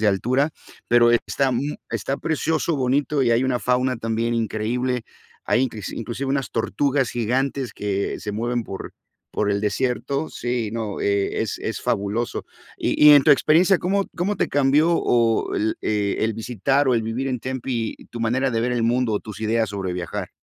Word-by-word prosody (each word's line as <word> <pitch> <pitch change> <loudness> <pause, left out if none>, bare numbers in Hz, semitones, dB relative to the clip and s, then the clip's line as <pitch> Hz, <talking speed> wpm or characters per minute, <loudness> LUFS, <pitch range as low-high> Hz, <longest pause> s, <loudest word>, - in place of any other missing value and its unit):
de 110 - +2
altura, 125 +9 +2 0.4
pero 120 0 +5
está 130 +3 +1
mu 135 +4 -2
está 135 - -2
precioso, 160 0 0
bonito 135 +2 +1
y 120 - +2
hay 115 +2 +3
una 130 -2 +1
fauna 125 +1 +1
también 115 +1 -1
increíble. 115 +2 -1 0.4
Hay 125 - +2
incles 110 -6 -3
inclusive 120 +4 -4
unas 135 -5 -1
tortugas 135 +3 0
gigantes 130 +3 -1
que 100 -1 -2
se 105 -1 -4
mueven 120 +2 -1
por 95 - -7 0.4
por 105 -1 0
el 100 0 0
desierto. 130 +7 -1
Sí, 120 -2 -2
no, 110 -3 -3
eh, 100 -1 0
es - - -2
es - - -4
fabuloso. 105 +4 -2 0.3
Y - - -1
y - - +11
en 145 - +7
tu - - +4
experiencia, 175 +6 +5
¿cómo 195 +2 0
cómo 190 +4 -1
te - - 0
cambió 145 +3 +3
o 115 -7 +2
el 110 +1 0
eh, 105 -2 0
el 110 0 0
visitar 125 +5 0
o 130 - +3
el 115 - +1
vivir 115 +5 -2
en 125 -2 -2
Tempe 125 -3 -3 0.2
tu 120 - -7
manera 130 +4 +1
de 115 -1 0
ver 125 +1 0
el 120 -2 0
mundo 120 0 +1
o 105 - -1
tus 105 -1 -9
ideas 110 -1 +1
sobre 95 -3 -3
viajar? 85 -2 -4
120 Hz, 185 wpm, -23 LUFS, 110-135 Hz, 0.4 s, y